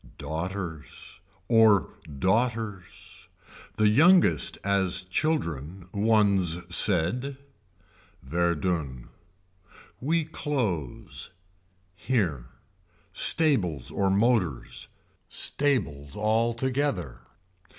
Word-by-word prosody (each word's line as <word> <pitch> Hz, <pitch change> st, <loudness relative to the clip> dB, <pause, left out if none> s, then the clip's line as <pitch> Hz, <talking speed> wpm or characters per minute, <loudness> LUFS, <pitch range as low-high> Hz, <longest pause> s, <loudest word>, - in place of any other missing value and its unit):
Daughters. 80 Hz, +2 st, -6 dB, 0.3 s
Or 110 Hz, -4 st, +4 dB, 0.2 s
daughters. 110 Hz, -, -2 dB, 0.5 s
The 105 Hz, -, +3 dB
youngest 170 Hz, -, +4 dB
as 95 Hz, -2 st, +1 dB
children 90 Hz, -, -2 dB
One's 100 Hz, -5 st, +2 dB
said. 125 Hz, -, +2 dB, 0.9 s
Verdun. 80 Hz, -4 st, -2 dB, 0.9 s
We 160 Hz, +4 st, 0 dB
close. 120 Hz, -, -4 dB, 0.6 s
Here. 90 Hz, -, -2 dB, 0.7 s
Stables 95 Hz, -, +3 dB
or 100 Hz, -1 st, 0 dB
motors. 100 Hz, -, 0 dB, 0.4 s
Stables 75 Hz, -, -1 dB
altogether. 115 Hz, -, -1 dB
100 Hz, 60 wpm, -26 LUFS, 85-120 Hz, 0.9 s, Or